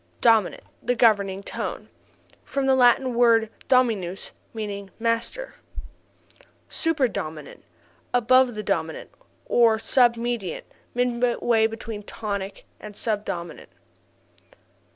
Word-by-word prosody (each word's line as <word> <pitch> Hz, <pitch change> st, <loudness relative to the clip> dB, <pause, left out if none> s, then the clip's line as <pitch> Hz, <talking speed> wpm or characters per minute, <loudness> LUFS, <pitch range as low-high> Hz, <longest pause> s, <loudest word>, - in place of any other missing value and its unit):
5. -, -, -35 dB
Dominant 225 Hz, -5 st, +3 dB, 0.2 s
the 245 Hz, -, 0 dB
governing 200 Hz, -4 st, +2 dB
tone. -, -, -5 dB, 0.6 s
(From 275 Hz, -1 st, -2 dB
the 265 Hz, -, +4 dB
Latin 255 Hz, 0 st, +4 dB
word 230 Hz, -2 st, +4 dB, 0.2 s
dominus 220 Hz, -8 st, +1 dB, 0.2 s
meaning 200 Hz, -3 st, -5 dB
master.) 235 Hz, -, -2 dB, 0.9 s
6. -, -, -25 dB, 0.2 s
Super 320 Hz, -5 st, +1 dB
dominant 155 Hz, -9 st, -7 dB, 0.5 s
above 245 Hz, 0 st, +4 dB
the 215 Hz, -, -4 dB
dominant. 165 Hz, -6 st, -3 dB, 0.3 s
Or 230 Hz, -2 st, +4 dB
Sub 240 Hz, +1 st, +3 dB
mediant 235 Hz, -5 st, -3 dB, 0.3 s
midway 240 Hz, -2 st, +2 dB
between 225 Hz, -1 st, -7 dB
tonic 200 Hz, -2 st, -5 dB
and 210 Hz, -1 st, -10 dB
sub 210 Hz, -2 st, -1 dB
dominant. 170 Hz, -3 st, -6 dB
225 Hz, 110 wpm, -24 LUFS, 200-245 Hz, 0.9 s, the